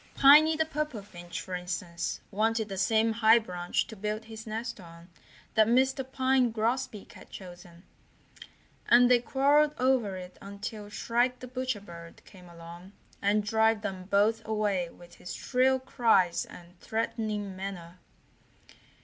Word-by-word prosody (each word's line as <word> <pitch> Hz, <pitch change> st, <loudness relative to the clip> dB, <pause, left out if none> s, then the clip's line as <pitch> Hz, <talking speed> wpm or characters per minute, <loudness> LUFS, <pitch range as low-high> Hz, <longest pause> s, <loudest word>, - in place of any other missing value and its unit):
Piney 305 Hz, +3 st, +7 dB
the 320 Hz, 0 st, +1 dB
Purple 300 Hz, -8 st, -4 dB
Finch, 175 Hz, -3 st, -8 dB
for 185 Hz, -, -8 dB
instance, 180 Hz, -1 st, -4 dB
wanted 220 Hz, +1 st, 0 dB
the 195 Hz, -, -4 dB
same 220 Hz, +3 st, +2 dB
high 225 Hz, 0 st, +5 dB
branch 180 Hz, -6 st, -2 dB
to 220 Hz, -, -10 dB
build 215 Hz, +2 st, -4 dB
his 220 Hz, 0 st, -10 dB
nest 225 Hz, +1 st, -5 dB
on 170 Hz, 0 st, -14 dB, 0.4 s
that 220 Hz, -1 st, +4 dB
Mr. 265 Hz, +3 st, +2 dB
Pine 260 Hz, -2 st, +2 dB
Grosbeak 225 Hz, -1 st, -2 dB
had -, -, -14 dB
chosen, 175 Hz, -2 st, -12 dB, 1.0 s
and 245 Hz, +1 st, +6 dB
they 245 Hz, -, +6 dB
quarreled 285 Hz, +4 st, +2 dB
over 250 Hz, -6 st, +1 dB
it 180 Hz, 0 st, -10 dB
until 205 Hz, +1 st, -7 dB
Shrike 240 Hz, +4 st, 0 dB
the 255 Hz, -, -9 dB
Butcher 255 Hz, -3 st, -3 dB
Bird 170 Hz, -3 st, -12 dB
came 180 Hz, -2 st, -15 dB
along 170 Hz, +3 st, -12 dB, 0.3 s
and 205 Hz, +1 st, +2 dB
drove 220 Hz, +1 st, +2 dB
them 190 Hz, -2 st, -5 dB
both 205 Hz, +3 st, +2 dB
away 210 Hz, -5 st, -1 dB
with 175 Hz, 0 st, -16 dB
his 180 Hz, -, -8 dB
shrill 260 Hz, +1 st, +2 dB
cries 230 Hz, -9 st, +2 dB
and 175 Hz, 0 st, -15 dB
threatening 215 Hz, -3 st, -3 dB
manner. 185 Hz, -2 st, -7 dB
215 Hz, 145 wpm, -29 LUFS, 185-245 Hz, 1.0 s, Piney